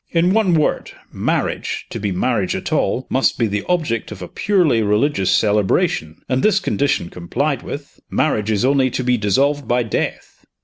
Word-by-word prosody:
In 175 +2 +2
one 205 -6 +3
word, 155 - 0 0.2
marriage, - - -2
to - - -4
be 100 -1 -2
marriage 100 +1 0
at - - -4
all, 130 - 0
must 130 +1 +1
be 115 - +2
the 105 -1 -2
object 155 -13 -1
of 95 -3 -7
a - - -6
purely 175 - +2
religious 105 -1 +1
celebration 95 -5 +1
and, 130 0 0
this 210 -2 +3
condition 140 - 0
complied 85 -1 -2
with, - - -8
marriage 105 0 0
is 105 +1 +1
only 135 -1 +3
to 130 - -3
be 125 0 +2
dissolved 135 +6 +1
by 120 +1 +2
death. 110 - -4
120 Hz, 175 wpm, -19 LUFS, 105-145 Hz, 0.2 s, one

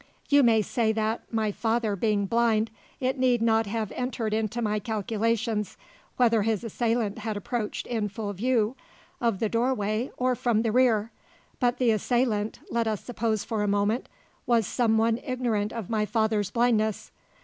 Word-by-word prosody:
You 285 0 +6
may 225 -4 +4
say 225 +1 +1
that, 220 +1 -2
my 220 -2 0
father 225 -1 0
being 205 0 +1
blind, 225 0 +2 0.3
it 260 +1 -1
need 250 -2 +3
not 225 -1 +2
have 215 0 -2
entered 245 -4 -2
into 220 +1 -1
my 215 -2 0
calculations 220 0 -1 0.4
whether 230 -3 +4
his 220 0 0
assailant 230 -2 -1
had 215 -1 -3
approached 210 +2 -3
in 220 -4 -2
full 205 +1 -4
view 230 +2 +1 0.4
of 230 -6 +1
the 220 - 0
doorway 230 0 0
or 255 0 +2
from 235 -2 +1
the 225 - +1
rear. 230 -3 +3 0.5
But 245 -1 +2
the 245 -3 +3
assailant 220 -1 0
let 230 -1 0
us 215 -2 -2
suppose 225 -3 -1
for 220 -3 -2
a 210 - 0
moment 205 +4 0 0.4
was 235 -3 +3
some 225 +1 +1
one 225 +1 +2
ignorant 235 -5 -1
of 225 -5 -5
my 215 -2 0
father's 220 -3 +1
blindness. 220 -2 +1
225 Hz, 165 wpm, -27 LUFS, 215-235 Hz, 0.5 s, You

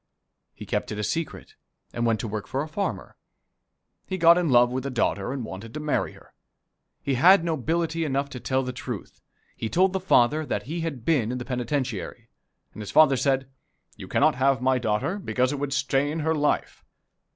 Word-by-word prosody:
He - - -9
kept - - -2
it 105 - -4
a 105 - -2
secret, 165 - -4 0.4
and 120 0 0
went 115 -2 +1
to - - -4
work 105 -1 -5
for 135 +2 -2
a - - -7
farmer. 195 +6 -4 0.9
He 190 - -3
got 170 -1 +7
in 175 -2 +1
love 120 -1 +5
with 130 +1 -2
the 140 - -3
daughter, 115 -3 -1
and 130 -4 -4
wanted 110 +3 -9
to - - -3
marry 150 -1 -1
her. - - -19 0.7
He 140 - 0
had 175 +8 +6
nobility 165 +1 -1
enough 140 -2 -1
to 125 - -6
tell 130 +2 0
the 125 0 -4
truth 125 -4 -7 0.3
he 110 - -4
told 185 - +3
the 190 - 0
father 155 -4 +3
that - - -3
he 165 +5 -4
had 145 -8 -5
been 130 -9 +2
in 125 - -3
the 125 - -6
penitentiary. 125 -4 -3 0.5
The 105 - -7
father 140 +7 +5
said, 135 0 0 0.4
"You - - -10
cannot - - +3
have 135 +1 +2
my 130 0 +2
daughter, 120 - -1
because 130 -8 0
it 145 - -4
would 145 -1 -3
stain 140 +3 0
her 160 +1 +1
life." 150 -1 -1
135 Hz, 195 wpm, -25 LUFS, 120-160 Hz, 0.9 s, got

